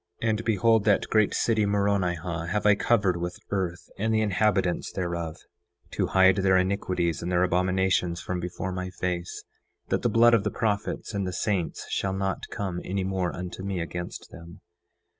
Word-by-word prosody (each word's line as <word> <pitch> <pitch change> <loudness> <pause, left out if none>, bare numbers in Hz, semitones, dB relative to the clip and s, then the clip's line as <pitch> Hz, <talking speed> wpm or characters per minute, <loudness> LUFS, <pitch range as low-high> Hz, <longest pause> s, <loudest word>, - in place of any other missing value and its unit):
9:5 115 - +2
And 110 +1 -1
behold, 115 0 +3
that 105 -2 +3
great 110 -2 +4
city 110 -2 +2
Moronihah 90 -5 0
have 105 +5 -1
I 105 - +7
covered 100 -4 +2
with 85 0 -4
earth, 90 -3 -2
and 110 +2 0
the 110 0 +2
inhabitants 100 -3 +1
thereof, 85 -3 -3 0.5
to - - 0
hide 95 0 +5
their 95 -1 +4
iniquities 90 -3 0
and 85 +1 -3
their 90 0 +3
abominations 90 -1 +1
from 90 0 -3
before 90 +1 -4
my 90 0 -4
face, 90 -1 -4 0.5
that - - +1
the - - +1
blood 120 +1 +5
of 115 -4 +4
the - - 0
prophets 105 +1 -2
and 100 -2 -1
the - - -2
saints 90 -1 -2
shall 95 -1 -1
not 95 0 -2
come 95 -3 -4
any 95 +1 -2
more 95 -2 -1
unto 90 0 -6
me 95 -1 -3
against 85 +1 -6
them. 85 +1 -12
95 Hz, 180 wpm, -26 LUFS, 90-100 Hz, 0.5 s, I